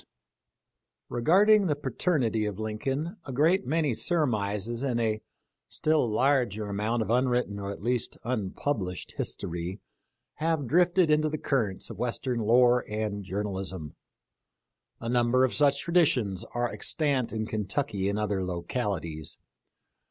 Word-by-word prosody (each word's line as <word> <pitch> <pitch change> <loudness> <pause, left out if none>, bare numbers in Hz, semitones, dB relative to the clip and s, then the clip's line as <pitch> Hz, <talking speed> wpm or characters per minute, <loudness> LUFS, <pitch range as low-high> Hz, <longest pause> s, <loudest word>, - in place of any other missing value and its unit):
t - - -32 1.0
Regarding 195 - +4
the 150 - +1
paternity 130 - 0
of 100 -2 -4
Lincoln 135 - -3
a 135 - -6
great 155 +3 +2
many 155 -2 +1
surmises 115 - -1
and 130 -4 0
a, 110 -2 0 0.5
still 155 -6 +1
larger 120 -3 +1
amount 105 +3 0
of 110 - -3
unwritten 125 -4 +1
or, 100 0 -4
at 100 - -7
least, 120 0 -1
unpublished 105 -3 -2
history 85 +3 -3 0.6
have 160 -2 0
drifted 175 +3 +3
into 155 0 +3
the 155 - -2
currents 110 -11 -1
of - - -9
western 125 0 -1
lore 120 +2 +4
and 105 -1 -2
journalism. 95 -5 -4 1.1
A 115 - -6
number 120 +2 +3
of 130 - -2
such 140 -1 +3
traditions 130 - +2
are 120 0 0
extant 140 -6 0
in 110 -1 -2
Kentucky 105 -1 -2
and 100 - -1
other 105 -3 -1
localities. 85 - -3
120 Hz, 130 wpm, -28 LUFS, 105-145 Hz, 1.1 s, Regarding